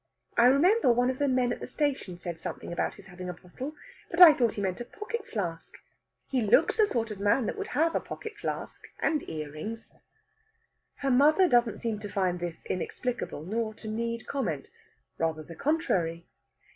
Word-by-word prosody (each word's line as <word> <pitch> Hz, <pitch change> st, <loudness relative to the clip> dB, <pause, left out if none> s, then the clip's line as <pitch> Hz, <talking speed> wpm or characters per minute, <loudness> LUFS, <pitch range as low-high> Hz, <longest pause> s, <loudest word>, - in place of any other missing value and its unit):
I 235 Hz, +1 st, +6 dB
remember 335 Hz, -, +5 dB
one 245 Hz, +2 st, +3 dB
of 260 Hz, -, -8 dB
the 285 Hz, -, +2 dB
men 255 Hz, -2 st, +2 dB
at -, -, -7 dB
the -, -, -6 dB
station 275 Hz, -, -2 dB
said 175 Hz, -2 st, -6 dB
something 170 Hz, -, -6 dB
about -, -, -1 dB
his 200 Hz, -, -14 dB
having 180 Hz, -1 st, -8 dB
a -, -, -3 dB
bottle, 250 Hz, -, -8 dB, 0.3 s
but 340 Hz, -, -3 dB
I 345 Hz, -4 st, +12 dB
thought 240 Hz, -6 st, +1 dB
he 205 Hz, -, -3 dB
meant 190 Hz, +4 st, -2 dB
a -, -, -4 dB
pocket 420 Hz, -, -6 dB
flask. 170 Hz, -7 st, -4 dB, 0.5 s
He 260 Hz, -2 st, 0 dB
looks 215 Hz, -2 st, +4 dB
the 430 Hz, -2 st, +5 dB
sort 230 Hz, -, -1 dB
of 205 Hz, -, -6 dB
man 205 Hz, +5 st, +3 dB
that -, -, -2 dB
would 410 Hz, 0 st, -4 dB
have 325 Hz, +2 st, +3 dB
a -, -, +2 dB
pocket 445 Hz, -1 st, -7 dB
flask -, -, -5 dB
and 310 Hz, -2 st, +1 dB
earrings." 155 Hz, +9 st, -6 dB, 1.0 s
Her 275 Hz, -1 st, -1 dB
mother 305 Hz, +8 st, +5 dB
doesn't 240 Hz, -6 st, +3 dB
seem 225 Hz, -3 st, -2 dB
to 205 Hz, -1 st, -6 dB
find 185 Hz, -3 st, 0 dB
this 175 Hz, -1 st, -5 dB
inexplicable, 235 Hz, -3 st, -3 dB
nor 220 Hz, +3 st, -2 dB
to 220 Hz, -, -10 dB
need 230 Hz, +1 st, -3 dB
comment. 180 Hz, -, -3 dB, 0.5 s
Rather 160 Hz, -1 st, -1 dB
the 165 Hz, +2 st, -11 dB
contrary. 175 Hz, -, 0 dB
230 Hz, 190 wpm, -29 LUFS, 180-280 Hz, 1.0 s, I